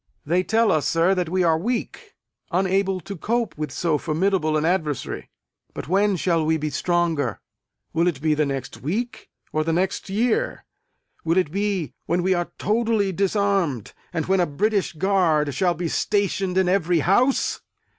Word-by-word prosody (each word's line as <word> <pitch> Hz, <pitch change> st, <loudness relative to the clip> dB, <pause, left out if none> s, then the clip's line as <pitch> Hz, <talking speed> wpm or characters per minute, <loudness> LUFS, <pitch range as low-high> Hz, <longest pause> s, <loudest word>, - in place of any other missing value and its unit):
They 175 Hz, +5 st, +2 dB
tell 220 Hz, +3 st, +2 dB
us, 155 Hz, -2 st, +1 dB
sir, 170 Hz, +3 st, +3 dB
that 180 Hz, -3 st, -1 dB
we 185 Hz, +1 st, +1 dB
are 160 Hz, -2 st, +3 dB
weak; 250 Hz, -, -4 dB, 0.3 s
unable 190 Hz, +1 st, +1 dB
to 200 Hz, +5 st, -7 dB
cope 230 Hz, +4 st, -1 dB
with 150 Hz, -2 st, -4 dB
so 160 Hz, -1 st, 0 dB
formidable 160 Hz, -1 st, +1 dB
an 155 Hz, -, 0 dB
adversary. 160 Hz, -6 st, -2 dB, 0.5 s
But -, -, -6 dB
when 200 Hz, +3 st, +2 dB
shall 170 Hz, -2 st, +1 dB
we 160 Hz, +1 st, +2 dB
be 155 Hz, -1 st, -3 dB
stronger? 165 Hz, -, 0 dB, 0.5 s
Will 170 Hz, +2 st, +2 dB
it 160 Hz, -7 st, -1 dB
be 155 Hz, +1 st, +2 dB
the 150 Hz, -1 st, +1 dB
next 135 Hz, -2 st, -5 dB
week, 225 Hz, -, -3 dB, 0.2 s
or 155 Hz, -, +1 dB
the 165 Hz, +1 st, 0 dB
next 190 Hz, +3 st, -1 dB
year? 245 Hz, -, 0 dB, 0.6 s
Will 165 Hz, +2 st, +1 dB
it 180 Hz, -6 st, +2 dB
be 200 Hz, -3 st, -1 dB
when 175 Hz, +2 st, +1 dB
we 190 Hz, +1 st, +3 dB
are 175 Hz, -1 st, -2 dB
totally 220 Hz, -2 st, +1 dB
disarmed, 195 Hz, -, 0 dB, 0.2 s
and 165 Hz, -3 st, -2 dB
when 190 Hz, 0 st, +2 dB
a 175 Hz, -, +2 dB
British 200 Hz, +7 st, 0 dB
guard 160 Hz, -5 st, +2 dB
shall 175 Hz, +5 st, +1 dB
be 170 Hz, +2 st, -2 dB
stationed 195 Hz, 0 st, 0 dB
in 190 Hz, -1 st, +3 dB
every 180 Hz, -3 st, +2 dB
house? 245 Hz, -, +2 dB
180 Hz, 170 wpm, -23 LUFS, 160-200 Hz, 0.6 s, sir